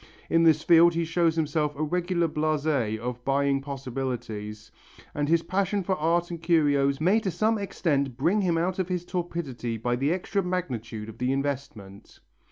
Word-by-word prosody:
In 165 - +4
this 160 -2 +4
field 170 0 +6
he 165 0 0
shows 165 0 +1
himself 150 -2 0
a 150 - -2
regular 175 +1 0
blasé 150 -7 0
of 125 +2 -5
buying 140 0 +1
possibilities 125 -6 -5 0.4
and 145 0 -1
his 165 0 +3
passion 195 +3 0
for 190 - 0
art 170 +2 0
and 170 -1 -6
curios 145 -5 +2
may 185 +8 +3
to 205 - -2
some 215 +5 +1
extent 140 -10 -1
bring 175 +10 +2
him 175 -3 +1
out 180 +3 -1
of 185 -1 -1
his 180 -1 -2
torpidity 160 -11 -4
by 120 +2 -1
the 135 +5 0
extra 190 +3 -1
magnitude 125 - -4
of 110 - -11
the 125 +1 0
investment. 135 -8 -5
155 Hz, 175 wpm, -26 LUFS, 135-175 Hz, 0.4 s, field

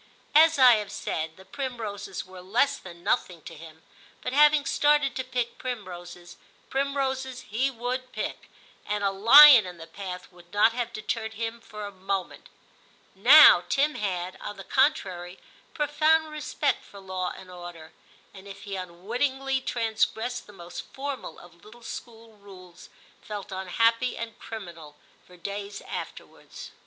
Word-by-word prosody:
As 320 +1 +6
I 250 -4 +7
have 205 -2 -5
said, 160 -3 -4
the 190 - -15
primroses 215 -8 -5
were 185 0 -12
less 230 +10 +1
than 175 -2 -12
nothing 170 -4 -1
to - - -10
him, 160 0 -13 0.4
but 250 - -3
having 300 0 +5
started 295 -3 +2
to 260 - -2
pick 250 -2 -3
primroses, 175 -7 -7 0.3
primroses 265 -2 -2
he 250 +6 -1
would 255 +1 -4
pick, - - -5 0.4
and 210 0 -2
a 200 - +2
lion 235 +3 +9
in 180 -1 -9
the 165 - -10
path 180 +1 -8
would 175 -1 -19
not 210 +2 +4
have 240 -1 -3
deterred 220 0 -4
him 230 +1 -4
for 210 -2 -8
a 205 - -7
moment. 195 - -5 0.6
Now 240 - +8
Tim 295 +2 +2
had, 185 -5 -3
on 205 - -7
the 195 - -8
contrary, 190 - 0 0.4
profound 310 +1 +2
respect 305 0 -2
for 200 - -14
law 185 -1 -4
and 185 -1 -12
order, 175 -3 -10 0.4
and 195 0 -13
if 195 -1 -11
he 200 -2 -5
unwittingly 245 +10 -2
transgressed 230 +1 -1
the - - -13
most 175 -3 -8
formal 275 -2 -7
of 170 0 -17
little 230 +3 -16
school 225 -2 -10
rules, 185 -3 -14 0.3
felt 205 -2 -7
unhappy 230 +6 +1
and 225 -2 -7
criminal 170 -9 -9 0.3
for 180 - -16
days 200 +2 -6
afterwards. - - -9
210 Hz, 150 wpm, -26 LUFS, 185-255 Hz, 0.6 s, lion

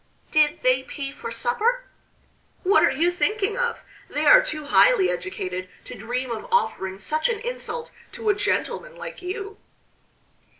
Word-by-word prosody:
"Did 305 +1 +3
they 255 0 +4
pay 275 +1 -6
for 235 - -7
supper?" 425 - 0 0.8
"What 400 +3 +5
are - - +6
you 345 +2 +2
thinking 410 +3 0
of? 485 -1 -1 0.3
They - - -1
are - - +9
too 310 -12 -5
highly 400 +5 +5
educated 185 - -4
to - - -9
dream 245 +3 -4
of 225 - -6
offering 445 - 0
such 310 - 0
an 470 - 0
insult 485 0 -4 0.2
to 455 -2 -2
a - - +6
gentleman 485 +4 -2
like - - -8
you." 390 +3 -6
370 Hz, 155 wpm, -24 LUFS, -, 0.8 s, are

